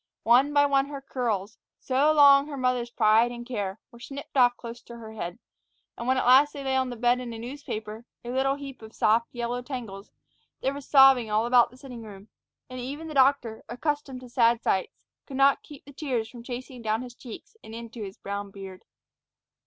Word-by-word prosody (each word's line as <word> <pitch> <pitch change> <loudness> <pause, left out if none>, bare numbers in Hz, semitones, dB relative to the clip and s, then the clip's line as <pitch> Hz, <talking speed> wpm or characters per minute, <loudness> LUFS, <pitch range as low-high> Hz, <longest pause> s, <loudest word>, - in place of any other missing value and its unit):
One 250 +5 +5
by 285 0 +4
one 275 -1 +2
her 285 -1 -6
curls, 230 -6 -3 0.2
so 275 +4 +2
long 285 -2 +7
her 290 -2 -6
mother's 250 -2 0
pride 225 +1 +3
and 240 0 -8
care, 205 -5 -4
were 235 - -15
snipped 275 +4 -9
off 245 -2 +4
close 235 0 -9
to 235 - -12
her 220 -1 -10
head; 175 -3 -5 0.6
and 235 - -6
when 260 0 +3
at - - 0
last 270 +4 +6
they 285 -2 -7
lay 265 -1 0
on 260 -1 +1
the 245 - -5
bed 245 +2 +2
in 245 -2 -6
a - - -7
newspaper, 225 -3 -7 0.2
a 240 - -4
little 270 +2 +1
heap 275 -3 -9
of 220 0 -12
soft, 230 +2 +3
yellow 240 0 -3
tangles, 230 -7 -7 0.5
there 270 - 0
was 285 -1 -9
sobbing 270 -5 +6
all 215 +2 +1
about 240 0 +5
in - - -22
the - - -15
sitting 255 -3 -10
room, 205 -1 -12 0.4
and 255 0 -8
even 285 +6 -6
the - - -6
doctor, 260 -5 +2
accustomed 275 +1 -3
to 250 - -12
sad 235 -1 +3
sights, 190 - -1 0.2
could 270 - -6
not 275 0 +4
keep 290 -2 -14
the 285 - -13
tears 255 -6 -2
from 235 +1 -11
chasing 250 +1 -7
down 220 +1 -1
his 245 -1 -10
cheeks 245 - -11
and 220 - -10
into 230 0 -8
his 195 -1 -7
brown 200 0 -5
beard. 195 -1 -11
245 Hz, 215 wpm, -26 LUFS, 225-270 Hz, 0.6 s, long